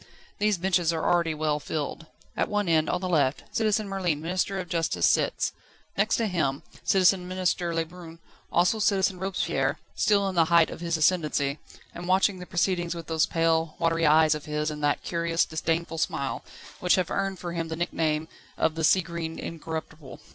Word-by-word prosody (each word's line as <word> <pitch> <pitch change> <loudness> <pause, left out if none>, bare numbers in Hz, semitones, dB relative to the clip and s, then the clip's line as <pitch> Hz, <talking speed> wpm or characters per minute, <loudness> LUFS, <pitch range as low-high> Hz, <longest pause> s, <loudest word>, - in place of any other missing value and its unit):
These 210 -1 +2
benches 175 -2 +1
are 165 -1 -2
already 170 -2 +2
well 150 -1 0
filled. 155 +2 -4 0.3
At - - 0
one 205 -2 0
end, 160 -2 +2
on 180 - -1
the 185 - -2
left, 145 -6 +1
Citizen 215 -1 +1
Merlin, 185 -6 -1
Minister 185 +4 -1
of 185 -1 -4
Justice, 165 - 0
sits; - - +2 0.4
next 210 +3 +2
to 230 - 0
him 160 -9 -1 0.2
Citizen 185 -1 +3
Minister 180 -1 -1
Lebrun; 165 0 -5 0.3
also 180 +6 +3
Citizen 195 -3 +2
Robespierre, 190 0 -1 0.2
still 200 -2 +2
in 190 - -2
the 170 -2 +4
height 170 0 +4
of - - -8
his 170 -1 0
ascendancy, 150 -4 +1 0.3
and 175 +1 -7
watching 190 +1 +2
the 180 - -9
proceedings 175 -1 0
with 165 -1 -7
those 160 -1 +1
pale, 165 -1 +1
watery 165 -1 +2
eyes 155 +1 +5
of 150 -1 -6
his 150 0 -2
and 150 0 -7
that 145 0 +1
curious, 170 -1 0
disdainful 165 +1 -2
smile, 140 -3 -2 0.4
which 180 - +3
have 185 -1 -1
earned 195 -1 -1
for 175 -1 -6
him 165 -1 -2
the 160 - -4
nickname 160 -2 -1 0.3
of 160 - +1
"the 160 0 -4
sea 185 +4 +5
green 170 -1 -5
incorruptible." 160 -3 -7
170 Hz, 185 wpm, -27 LUFS, 160-185 Hz, 0.4 s, eyes